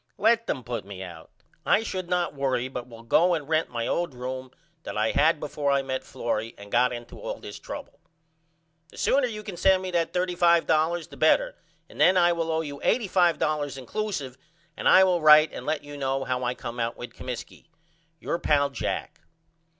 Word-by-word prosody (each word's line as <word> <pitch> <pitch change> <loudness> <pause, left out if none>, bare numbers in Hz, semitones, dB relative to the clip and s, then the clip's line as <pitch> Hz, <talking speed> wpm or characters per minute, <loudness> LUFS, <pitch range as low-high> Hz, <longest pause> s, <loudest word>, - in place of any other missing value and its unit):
Let 230 +2 +3
them 130 - -2
put 120 -3 -4
me 95 -1 -8
out. 85 -3 -10 0.3
I 215 - +3
should 185 -5 -4
not 180 -2 0
worry 135 -3 -1
but 125 -2 -6
will 115 -1 -12
go 175 +9 +3
and 150 -4 -5
rent 160 0 +1
my 115 -1 -3
old 170 -6 -1
room 130 +1 -5 0.3
that - - -6
I 110 +1 +2
had 155 +1 +3
before 145 -1 -2
I 140 -1 +2
met 130 -1 -3
Florrie 115 -1 -3
and 100 0 -12
got 125 +1 +3
into 120 -1 -8
all - - -4
this - - -10
trouble. - - -9 0.9
The - - -16
sooner 270 -1 +2
you 215 -2 -6
can 200 -4 -7
send 190 0 +3
me 185 - -4
that 170 -2 0
$35.00 170 -2 +2
the - - -13
better - - +3 0.3
and - - -7
then 185 - +6
I 175 -1 +5
will 165 -1 -2
owe 160 0 +1
you 145 -3 -7
$85.00 165 - +1
inclusive 140 - -4 0.4
and - - +1
I 190 - +8
will 180 -2 +2
write 155 0 +7
and - - -7
let 155 -2 -1
you 145 0 -9
know 135 -1 -1
how 125 -1 -2
I 125 0 -1
come 120 0 -7
out 115 0 -2
with 120 -1 -8
Comiskey. 125 +4 -8 0.5
Your 170 - -2
pal, 140 -2 +2
JACK. - - -4
150 Hz, 195 wpm, -26 LUFS, 125-175 Hz, 0.9 s, I